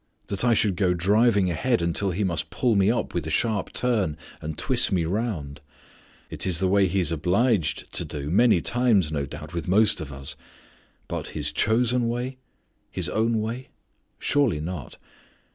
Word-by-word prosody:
That 100 +1 -1
I 120 -2 +4
should 100 -6 +1
go 90 -3 +2
driving 100 +1 +3
ahead 120 +8 0
until 85 +4 +1
He 95 +4 -1
must 85 -4 -2
pull 125 -3 +1
me 100 0 +3
up 120 - -1
with 85 -3 -2
a - - -3
sharp 110 +2 0
turn, 105 -11 0 0.2
and 75 0 -5
twist 125 -3 +2
me 90 -4 +1
around! 85 -7 -3 0.7
It - - -1
is 90 -3 +2
the 95 +2 +1
way 100 0 +3
He 95 +2 0
is 85 -2 +1
obliged 90 - 0
to - - 0
do 75 0 -5
many 110 -2 +4
times, 115 -9 +2
no 70 -2 -2
doubt, 75 +2 -9
with 85 -3 -4
most 105 +1 +3
of 75 -2 -7
us. 70 +1 -6 0.7
But - - -4
His - - +1
chosen 120 +2 +1
way? 125 +2 -4 0.5
His - - -1
own 115 0 +1
way? 120 +4 -5 0.5
Surely 135 - +1
not. 80 -5 -6
95 Hz, 180 wpm, -25 LUFS, 80-115 Hz, 0.7 s, I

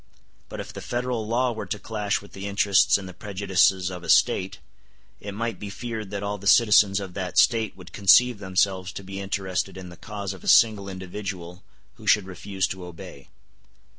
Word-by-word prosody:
But - - -7
if - - -7
the - - -7
Federal 120 -2 -3
law 125 +2 +1
were 110 -3 -6
to 105 - -3
clash 105 -1 -2
with 100 - -16
the 95 +1 -6
interests 100 -1 +3
and 100 -2 -8
the 90 - -9
prejudices 95 -2 +1
of 90 -1 -7
a - - -8
State, 95 0 +3 0.6
it 100 - -7
might 115 -3 -3
be 105 - -6
feared 110 -1 -6
that 100 0 -5
all 100 0 -3
the 100 - -6
citizens 105 -2 +5
of 95 -2 -7
that 95 -1 -5
State 110 -3 +3
would 90 -2 -13
conceive 115 +3 +5
themselves 95 -1 0
to 100 - -7
be 95 +1 -7
interested 95 -2 -3
in 90 -1 -8
the 85 - -12
cause 100 -1 -6
of 95 - -13
a - - -9
single 105 -4 +4
individual 95 -1 -7 0.4
who - - -13
should 105 -3 +4
refuse 95 +1 -3
to 95 -1 -6
obey. 90 -4 -11
100 Hz, 195 wpm, -25 LUFS, 95-105 Hz, 0.6 s, citizens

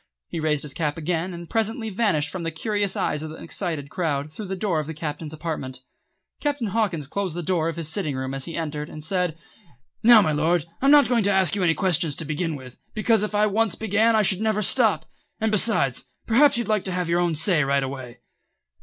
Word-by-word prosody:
He 165 - -4
raised 155 -2 0
his 145 -2 -5
cap 150 -1 -2
again 165 +2 -2
and 170 -1 -8
presently 225 +1 -1
vanished 185 -9 0
from 185 - -5
the 165 - -2
curious 205 +4 -2
eyes 150 - -1
of 155 - -5
the 155 - -8
excited 160 -4 -4
crowd, 155 -4 -2
through 210 +2 -7
the 190 - -3
door 185 -4 0
of 150 - -4
the 160 - -6
Captain's 150 0 -5
apartment. 150 -5 -5 0.6
Captain 290 -5 -1
Hawkins 190 -8 -1
closed 185 +3 -3
the 175 - -4
door 165 -1 0
of 165 - -5
his 165 -2 -4
sitting 155 -4 -2
room 130 0 -4
as 135 -1 -3
he 165 - -6
entered, 150 -2 -4
and 155 - -9
said: 180 -1 -1 0.6
"Now, 230 0 +8
my 155 - +1
Lord, 155 +2 +1 0.2
I'm 275 - +4
not 290 0 +7
going 245 -2 +2
to 200 - +3
ask 190 0 +4
you 200 - -2
any 165 -3 +3
questions 170 -5 +1
to 165 - -3
begin 155 +2 -2
with, 130 -2 -11 0.2
because 220 0 +2
if 210 0 -2
I 210 +1 +4
once 215 +1 +1
began 220 +1 +2
I 215 - +4
should 190 0 +3
never 215 -1 +1
stop; 225 0 +3 0.3
and 220 0 0
besides, 195 - +2 0.2
perhaps 260 +4 +4
you'd 235 - -2
like 215 -3 0
to 190 - -2
have 180 -1 -2
your 170 +1 +1
own 175 -2 +1
say 165 0 +4
right 140 0 +1
away." 130 -2 -7
175 Hz, 230 wpm, -24 LUFS, 150-210 Hz, 0.6 s, Now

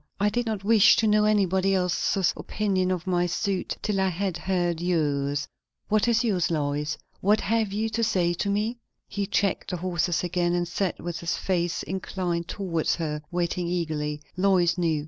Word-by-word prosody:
I 205 +1 +3
did 240 +2 -1
not 215 -3 -2
wish 215 0 +6
to 225 - +1
know 210 0 +4
anybody 195 -2 +2
else's 180 0 +1
opinion 190 -3 -1
of 180 -2 -2
my 175 -1 +1
suit 185 +2 -2
till 210 -2 0
I 190 - +2
had 185 0 -2
heard 175 -2 -1
yours. 145 -5 0 0.4
What 215 +2 +2
is 235 0 +3
yours, 195 -7 +1
Lois? 150 -1 -1 0.2
what 205 +2 +3
have 220 -2 0
you 215 +2 -1
to 230 +1 -1
say 180 -6 +2
to 200 +4 -2
me?" 215 +4 -1 0.3
He 200 -1 -3
checked 200 -1 0
the 180 - -2
horses 175 -1 0
again, 175 0 0
and 175 0 0
sat 180 +1 -2
with 170 -1 -4
his 170 - -2
face 175 -2 -1
inclined 180 -2 -3
towards 175 -6 -1
her, 150 -3 -3
waiting 175 0 -1
eagerly, 155 -4 -2
Lois 180 -2 +3
knew. 165 -4 +1
180 Hz, 180 wpm, -26 LUFS, 170-200 Hz, 0.4 s, wish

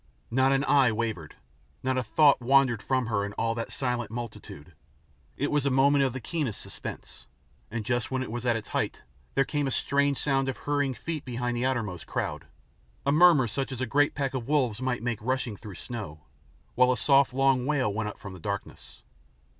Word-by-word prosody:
Not 130 +2 +3
an 135 0 +2
eye 135 -5 +4
wavered, 110 -8 -3 0.5
not 130 0 +1
a 130 - +1
thought 140 +4 +4
wandered 130 -3 +3
from 130 +1 0
her 105 -3 0
in 100 0 -5
all 115 +1 0
that 115 +1 -5
silent 125 -2 -2
multitude. 110 -9 -8 0.6
It 145 - -1
was 150 -2 +2
a 140 - +2
moment 140 +2 +4
of 135 - +1
the 130 - -5
keenest 135 - -3
suspense, - - -8 0.4
and 110 -1 -4
just 120 -2 0
when 130 0 -1
it 125 - -7
was 120 0 -4
at 120 -2 +2
its 110 -2 -5
height - - -2 0.3
there 135 - +3
came 145 -2 -1
a - - 0
strange 140 +1 +1
sound 135 -2 +1
of 130 - -4
hurrying 145 -2 -1
feet 160 0 -5
behind 120 -1 -3
the 120 +2 0
outermost 110 -9 -3
crowd, - - -3 0.6
a 140 - +3
murmur 155 -4 +6
such 135 +5 -3
as 130 - -5
a 130 - 0
great 145 +4 +2
pack 140 -2 -1
of 125 -3 -4
wolves 130 -6 +1
might 125 -3 -1
make 120 -3 -1
rushing 130 -1 -1
through 100 -1 -10
snow, 100 -12 -7 0.5
while 125 +1 +4
a 125 - 0
soft 135 +3 +4
long 135 -1 +2
wail 135 -9 +1
went 110 0 -2
up - - -10
from 100 -2 -9
the 90 - -10
darkness. - - -6
130 Hz, 205 wpm, -27 LUFS, 115-135 Hz, 0.6 s, murmur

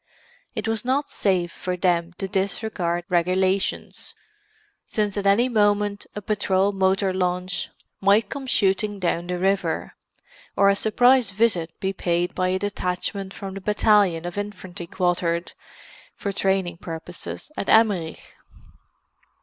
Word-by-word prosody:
It 215 - -3
was 225 -1 0
not 270 +4 0
safe 180 -4 +1
for 180 +1 -4
them 175 -1 +1
to 195 - -3
disregard 190 -3 -1
regulations, 185 +2 0 0.7
since 210 -2 -1
at 200 -1 -1
any 215 +6 +4
moment 205 -3 +1
a 210 - -5
patrol 200 -1 +1
motor 190 0 +1
launch 180 0 -1 0.3
might 200 +2 +4
come 275 +3 -6
shooting 205 -2 +2
down 175 -2 -1
the 180 0 -2
river, 195 +2 0 0.6
or 200 0 +5
a 200 - +4
surprise 245 +3 +4
visit 190 -5 0
be 190 0 -1
paid 175 -1 -1
by 185 - 0
a 185 +1 +1
detachment 190 0 -3
from 195 -1 -7
the 195 - -7
battalion 205 -4 +3
of 175 +3 -4
infantry 185 -4 -7
quartered, 175 -1 0 0.6
for 200 - -3
training 190 -3 0
purposes, 170 - -7
at - - -3
Emmerich. 200 -8 +2
195 Hz, 135 wpm, -24 LUFS, 180-205 Hz, 0.7 s, or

